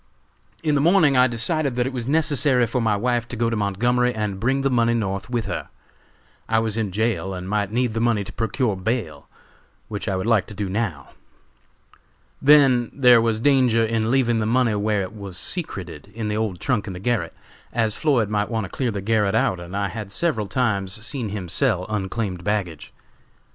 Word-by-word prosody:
"In 155 -2 +1
the 145 - +2
morning 165 -3 +4
I 125 0 +6
decided 130 +4 0
that 125 0 +1
it 130 - -3
was 120 -2 -4
necessary 145 -4 +2
for 120 +2 -2
my 110 -2 +1
wife 120 +2 0
to 125 - -6
go 115 0 0
to - - 0
Montgomery 120 +5 +1
and 105 -3 -3
bring 130 +5 0
the 135 - +1
money 120 -1 +2
North 100 -1 -3
with 120 -2 -1
her. - - -4 0.8
I 110 - +2
was 110 -1 0
in 110 -4 -1
jail 95 -3 -1
and 90 0 -6
might 105 0 -1
need 120 0 0
the 115 - -2
money 115 -3 +1
to 100 0 -10
procure 115 -1 -1
bail, 95 - -3 0.6
which 105 0 -5
I 95 - 0
would 95 - -2
like 115 -4 +2
to 105 - -10
do 100 -1 -3
now. 95 -9 -3 1.3
Then, 135 -4 +5
there 125 -4 +5
was 115 -1 0
danger 125 -3 +3
in 110 0 0
leaving 120 -3 +2
the 110 - -1
money 120 -1 +2
where 105 -1 0
it 95 +4 -8
was 100 -4 -8
secreted 95 - -5
in 110 -2 -3
the 105 - -1
old 105 -5 -2
trunk 125 -6 -1
in 95 - -5
the 90 - -7
garret 120 +3 -1 0.4
as 110 -2 0
Floyd 130 -7 +1
might 105 0 -1
want 110 -3 -2
to 90 - -11
clear 130 -3 -1
the 100 -3 -3
garret 105 -1 +1
out, 95 - +1
and 85 +3 -6
I 100 -1 -1
had 105 +1 -7
several 110 -5 0
times 100 -1 -1
seen 120 -3 -3
him 100 -3 -5
sell 95 -1 0
unclaimed 95 -3 -3
baggage. 100 -6 -3
110 Hz, 205 wpm, -22 LUFS, 100-125 Hz, 1.3 s, I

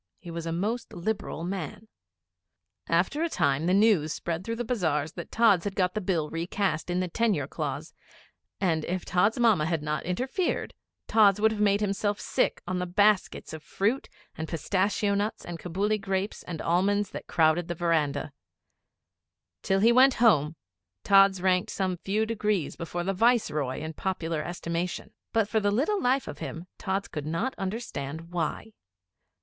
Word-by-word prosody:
He 170 - -10
was 165 0 -5
a - - -1
most 215 +8 -2
liberal 175 -3 -3
man. 185 +3 -5 1.0
After 180 - +1
a 335 - +1
time 150 - +1
the 180 - +3
news 200 -7 +4
spread 170 +2 -3
through 230 +3 -3
the 240 +1 -3
bazars 160 - 0
that 170 -1 -8
Tods 220 -6 +4
had 200 -1 -3
got 180 -2 +1
the 215 - -2
Bill 175 -5 0
recast 170 0 -1
in 180 +1 0
the 185 - -1
tenure 195 - +1
clause, - - -5 0.7
and, 165 -5 +1
if 180 +1 -3
Tods' 185 +5 +2
Mamma 215 -10 +4
had 165 -3 -1
not 150 -1 -2
interfered, 260 - -2 0.3
Tods 210 -3 +5
would 220 +1 +4
have 215 -1 -3
made 205 0 +3
himself 205 0 0
sick - - 0
on 180 0 -2
the 180 - -2
baskets 205 -1 +2
of 160 - -7
fruit 215 - -1 0.3
and 160 0 -5
pistachio 200 +5 0
nuts 205 +2 -2
and 175 -1 -6
Cabuli 200 +6 -1
grapes 195 +1 -2
and 170 -3 -5
almonds 195 +4 +1
that - - -7
crowded 160 +1 +2
the 175 - -3
verandah. 165 -4 0 1.3
Till 195 0 +1
he 230 +3 +6
went 255 +2 +6
Home, 165 -10 +4 0.5
Tods 195 -2 +5
ranked 185 +2 +2
some 185 -2 -1
few 205 +5 0
degrees 210 -7 -1
before 170 +1 -4
the 195 +2 -1
Viceroy 180 - +1
in 160 +1 -5
popular 165 -3 -2
estimation. 170 +1 -4 0.2
But 225 -3 +2
for 220 +1 +1
the 205 -1 +1
little 295 - +1
life 255 +2 +1
of 145 - -7
him 165 +2 -6
Tods 195 0 -2
could 150 -1 -6
not 195 - -1
understand 165 - -5
why. 175 +5 -3
185 Hz, 170 wpm, -27 LUFS, 165-210 Hz, 1.3 s, he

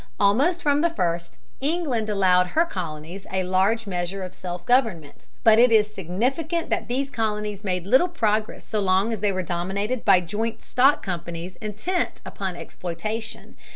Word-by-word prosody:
Almost 275 - +3
from 290 0 +3
the 340 - +3
first, 170 - -2 0.2
England 275 -7 -1
allowed 185 -3 +4
her 325 - +2
colonies 175 - -6
a 190 0 0
large 190 +5 +2
measure 185 0 -3
of 185 0 -7
self 175 -1 -6
government, 220 - 0 0.2
but 220 0 +7
it 245 0 +6
is 210 -1 +4
significant 265 - -2
that - - 0
these 270 +3 -2
colonies 210 -3 -2
made 180 -3 -2
little 260 - +4
progress 220 -10 -1
so 215 - -1
long 195 +3 +2
as 220 - -3
they 205 0 +1
were 185 -1 -2
dominated 195 +8 -2
by 195 -3 +6
joint 215 +6 -3
stock 270 +3 +3
companies 170 -1 -5
intent 215 - -2
upon 190 -3 -4
exploitation. 215 +7 -5
210 Hz, 160 wpm, -24 LUFS, 185-240 Hz, 0.2 s, but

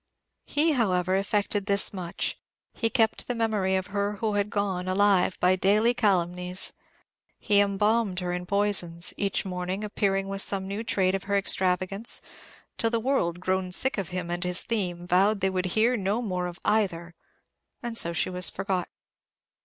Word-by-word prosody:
He, 310 +3 +2
however, 185 - +1
effected 200 +1 0
this 200 0 +2
much: 180 -3 -3 0.3
he 225 - 0
kept 225 -3 +1
the 245 - -2
memory 215 -5 0
of 190 -1 -1
her 200 0 0
who 210 +1 -2
had 205 0 0
gone, 195 -3 -2
alive 190 -1 +2
by 180 +1 +4
daily 210 +5 +3
calumnies. 180 -4 0 0.6
He 205 -2 +3
embalmed 205 0 +1
her 180 -1 -3
in 180 0 -5
poisons, 195 -4 0
each 200 -1 -1
morning 185 +2 -3
appearing 195 -2 -1
with 195 0 -2
some 195 -1 -1
new 200 +3 -4
trait 190 -4 +1
of 195 0 -3
her 200 0 +1
extravagance, 190 +2 +1 0.6
till 230 - +3
the 230 0 0
world, 220 -9 0
grown 185 0 -1
sick 260 +4 +5
of 190 - -4
himself 180 -1 -3
and 175 +1 -3
his 180 0 +1
theme, 180 -6 -2
vowed 195 +4 +3
they 190 0 +1
would 185 0 -1
hear 235 +3 +4
no 205 +1 -1
more 185 -6 -2
of 175 0 -9
either; 175 -6 0 0.7
and 235 -1 -4
so 170 -6 +1
she 170 +2 -1
was 180 -1 +1
forgotten. 185 -2 -3
195 Hz, 170 wpm, -26 LUFS, 180-210 Hz, 0.7 s, sick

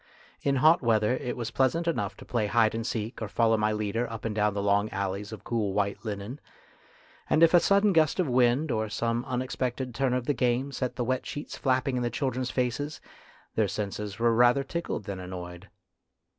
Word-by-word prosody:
In 140 -1 +1
hot 155 +6 +5
weather 110 -1 +2
it 125 -2 -4
was 115 -2 -4
pleasant 150 +7 +1
enough 170 - -1
to - - -12
play 115 -4 0
hide 110 0 +3
and 115 +1 -3
seek 110 +1 -4
or 110 - -2
follow 115 +1 +2
my 105 0 +1
leader 110 +3 -1
up 115 -1 -7
and 110 - -1
down 105 -1 +1
the 100 - -1
long 100 +1 +2
alleys 100 +2 -3
of 110 - -9
cool 110 -5 -1
white 100 0 -1
linen, 105 +5 -5 0.9
and 160 - +4
if 165 - +6
a 175 - +8
sudden 200 +3 +3
gust 160 +1 +3
of 180 - +2
wind 125 +4 +2
or 110 -1 -1
some 115 +2 -1
unexpected 130 0 -3
turn 130 0 0
of 125 -1 -2
the 145 - +1
game 125 +2 0
set 130 -2 -3
the 120 - -2
wet 130 +1 -1
sheets 145 - -6
flapping 130 -1 0
in - - -1
the 120 - 0
children's 130 +1 -2
faces, 130 +4 -2 0.5
their 110 -2 +2
senses 100 +2 -4
were 115 0 +3
rather 120 +4 +4
tickled 170 -6 -4
than 100 -2 -5
annoyed. 90 0 -8
120 Hz, 205 wpm, -28 LUFS, 105-130 Hz, 0.9 s, a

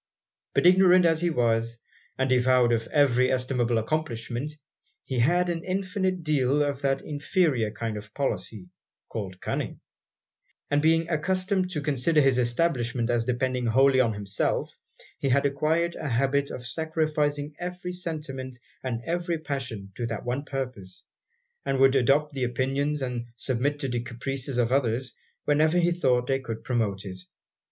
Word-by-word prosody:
But - - +3
ignorant 180 0 +6
as 165 -1 +3
he 175 - +2
was, 115 -5 +1 0.4
and 130 - +1
devoid 125 -1 +4
of 115 -1 0
every 130 -4 +3
estimable 125 -2 +1
accomplishment, 120 0 -2 0.5
he 130 -2 -2
had 175 +9 +3
an 170 -1 -2
infinite 185 -1 -1
deal 145 -1 +2
of 140 -1 -2
that 135 -1 0
inferior 145 - +1
kind 110 0 -4
of 105 0 -9
policy 105 -7 -3 0.4
called 95 -4 -5
cunning; - - -3 0.9
and 145 0 +3
being 165 +1 +3
accustomed 185 +3 0
to 160 -5 -3
consider 150 +2 +2
his 135 -3 +4
establishment 120 -2 0
as 120 -1 +1
depending 125 0 0
wholly 130 +3 +4
on 115 -3 +3
himself, 100 -1 -2 0.4
he 135 - 0
had 140 +2 +3
acquired 155 +5 +1
a 155 - -4
habit 140 +3 +1
of 125 - -7
sacrificing 150 -1 -1
every 180 0 -5
sentiment 150 -7 -5 0.3
and 120 -3 -3
every 175 0 -1
passion 130 -10 -5
to 120 - -2
that 115 -2 -5
one 125 +3 -2
purpose; 125 -10 -5 0.6
and 135 -1 0
would 135 0 +5
adopt 140 +4 +3
the 135 -2 -2
opinions, 135 +4 0
and 120 -2 -3
submit 130 +4 -1
to 145 -2 -3
the 120 -1 -1
caprices 130 +2 -4
of 120 -1 +2
others, 130 -1 +1 0.3
whenever 155 +3 +3
he 175 0 +3
thought 125 -8 +2
they 135 +1 +1
could 115 -4 -6
promote 110 -6 -1
it. 95 -1 -7
135 Hz, 155 wpm, -26 LUFS, 120-155 Hz, 0.9 s, ignorant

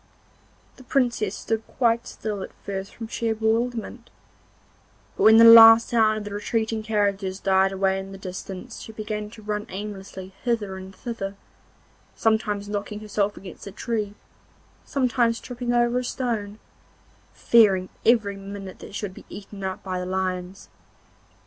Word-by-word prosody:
The 260 - -14
Princess 245 -7 0
stood 225 -1 -2
quite 235 -2 +1
still 210 -3 -5
at - - -7
first 195 -1 -5
from 225 - -7
sheer 225 0 -1
bewilderment, 225 +1 -1 1.1
but - - -5
when 220 +1 +8
the 230 - +8
last 230 0 +10
sound 220 -2 +3
of 215 - -5
the 205 -1 -7
retreating 220 +1 -1
carriages 200 -3 -1
died 190 0 +3
away 195 0 +1
in 195 0 -8
the 195 - -8
distance 190 +4 -7
she - - -9
began 210 -1 -4
to 215 0 -14
run 210 0 -3
aimlessly 190 -1 -7
hither 225 -6 -1
and 190 0 -10
thither, 200 -5 -5 0.8
sometimes 215 -2 0
knocking 205 0 -4
herself 210 -1 -1
against 195 +1 -10
a - - -6
tree, 210 0 -3 0.7
sometimes 240 -3 +1
tripping 245 -1 -4
over 240 0 +2
a - - -3
stone, 225 -5 -3 0.7
fearing 195 -5 +4 0.2
every 220 -4 +3
minute 195 -1 -8
that - - -10
she 210 - -3
would 190 - -7
be - - -13
eaten 200 -1 -9
up 190 -1 -4
by 185 -1 -3
the 180 - -4
lions. 185 0 -3
210 Hz, 155 wpm, -24 LUFS, 195-230 Hz, 1.1 s, last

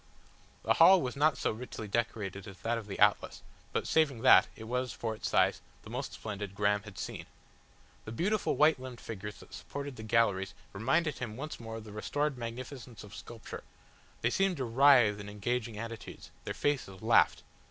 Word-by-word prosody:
The - - +3
hall 190 0 +8
was 125 -4 -3
not 145 -1 +3
so - - 0
richly 110 -1 -7
decorated 100 -3 -2
as 95 - -10
that 115 0 0
of 110 - -10
the 100 - -5
Atlas, - - +2 0.3
but - - -1
saving 140 -7 +2
that, - - +8
it 110 - -10
was, 125 +2 -2
for 115 -1 -3
its 110 - -4
size, - - +3 0.2
the - - -11
most - - -4
splendid 100 -2 -6
Graham 105 0 +2
had 105 -2 -12
seen. - - -6 0.8
The 110 - -6
beautiful 195 - 0
white 155 -1 +4
limbed 130 -2 -8
figures 105 -1 -7
that - - -15
supported 140 -2 -6
the - - -7
galleries 110 -4 +1 0.2
reminded 135 +9 +1
him 110 -3 -5
once 150 +4 -6
more 115 -1 -7
of 115 - -7
the 105 - -11
restored 145 +7 -1
magnificence 125 0 -7
of 105 0 -12
sculpture; 115 -2 -9 0.6
they 120 - +2
seemed 195 +1 +1
to 130 - -2
writhe 120 -4 +5
in 100 0 -7
engaging 110 +2 -2
attitudes, 115 0 -8
their - - -4
faces 130 -10 -2
laughed. 115 0 +4
115 Hz, 185 wpm, -31 LUFS, 105-130 Hz, 0.8 s, hall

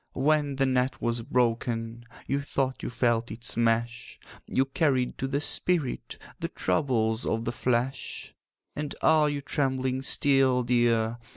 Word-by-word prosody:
'When 145 0 +1
the 135 0 +2
net 130 0 0
was 120 0 -1
broken, 115 -1 -1 0.2
You 140 +1 -1
thought 135 -2 -2
you - - -4
felt 120 -1 0
its 115 +3 -5
mesh; 115 0 -1 0.3
You 130 - +1
carried 135 -2 0
to 135 - -1
the 140 +1 -1
spirit 155 -2 -1 0.2
The - - -2
troubles 110 +2 0
of 115 +1 -1
the 120 - -1
flesh. 125 +2 -2 0.4
'And 150 -1 -4
are 155 -1 +5
you 145 -1 -3
trembling 130 -2 -1
still, 135 -2 +3
dear? 120 -1 +1
125 Hz, 145 wpm, -27 LUFS, 115-135 Hz, 0.4 s, are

